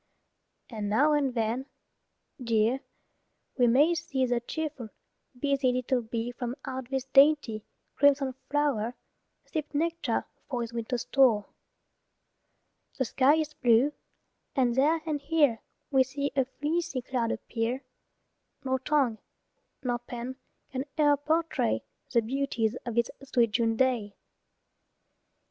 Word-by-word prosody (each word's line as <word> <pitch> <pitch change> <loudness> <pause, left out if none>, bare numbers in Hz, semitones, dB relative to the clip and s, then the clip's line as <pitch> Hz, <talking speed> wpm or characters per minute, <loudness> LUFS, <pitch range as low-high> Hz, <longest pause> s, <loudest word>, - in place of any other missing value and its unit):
And 210 -3 -3
now 290 +9 +4
and 275 -4 +1
then, 235 +4 -1 0.8
dear, 230 +2 +2 0.8
we 245 -2 +4
may 285 +8 +5
see 285 -6 -1
The 245 -1 +1
cheerful, 280 -2 -5 0.5
busy 275 -2 +2
little 250 0 0
bee 230 +1 -3
From 245 0 -4
out 260 -1 -5
this 265 -1 -1
dainty, 270 -5 +4 0.3
crimson 275 -2 +3 0.2
flow'r, 275 -6 0 0.5
Sip 310 -2 -4
nectar 335 +2 0 0.2
for 245 -3 -1
his 235 0 -5
winter 235 +2 -2
store. 240 -4 +3 1.5
The 260 - +1
sky 270 +5 +4
is 310 -1 -1
blue, 245 +4 +3 0.6
and 250 -3 +3
there 300 +6 +3
and 300 -3 -2
here 285 -6 +2 0.3
We 265 -2 +5
see 280 +2 -3
a 265 -2 +3
fleecy 295 0 -2
cloud 240 -3 -1
appear; 235 +4 -2 0.8
Nor 260 0 +1
tongue 260 -5 +1 0.6
nor 245 -2 0
pen 240 +1 -6 0.4
can 260 0 -2
e'er 295 -1 +5
portray 300 - 0 0.3
The 235 - +3
beauties 245 -2 -1
of 235 - -3
this 235 0 +1
sweet 245 -5 +1
June 225 0 +1
day. 230 -5 +1
260 Hz, 125 wpm, -28 LUFS, 235-285 Hz, 1.5 s, may